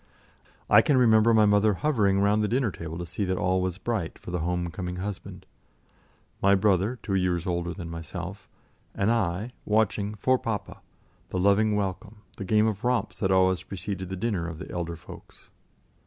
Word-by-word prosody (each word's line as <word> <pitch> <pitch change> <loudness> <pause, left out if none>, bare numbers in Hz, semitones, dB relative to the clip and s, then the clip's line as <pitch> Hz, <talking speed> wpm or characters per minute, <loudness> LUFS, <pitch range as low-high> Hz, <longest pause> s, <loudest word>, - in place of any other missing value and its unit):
I - - +7
can 145 - +2
remember 115 -2 +5
my 110 -1 +5
mother 105 0 +3
hovering 100 -7 +2
round 105 +1 +3
the - - +1
dinner 120 -1 +1
table 85 -1 -7
to 85 - -5
see 90 +5 -4
that 95 0 -1
all 95 0 +1
was 90 -1 -2
bright 105 -5 -3
for - - -9
the 90 - -1
home 85 +1 -2
coming 90 +2 -5
husband; 95 +1 -6 1.0
my 100 +1 +5
brother 100 +4 +2
two 100 - -3
years 90 -2 0
older 85 -1 -2
than 90 -2 -7
myself 85 +3 -7 0.5
and 100 +3 +1
I 105 +1 -1
watching 105 -1 +1
"for 130 +4 +2
papa"; 105 -4 -4 0.5
the - - -3
loving 100 +3 +3
welcome, 105 +2 -4
the - - -5
game 105 +3 +3
of 110 -1 -2
romps 125 0 0
that 95 - +1
always 95 -1 +3
preceded 95 -1 -5
the 95 - -3
dinner 95 -4 -2
of 80 -2 -6
the - - -8
elder 85 -1 -3
folks. 80 - -14
100 Hz, 185 wpm, -26 LUFS, 90-110 Hz, 1.0 s, I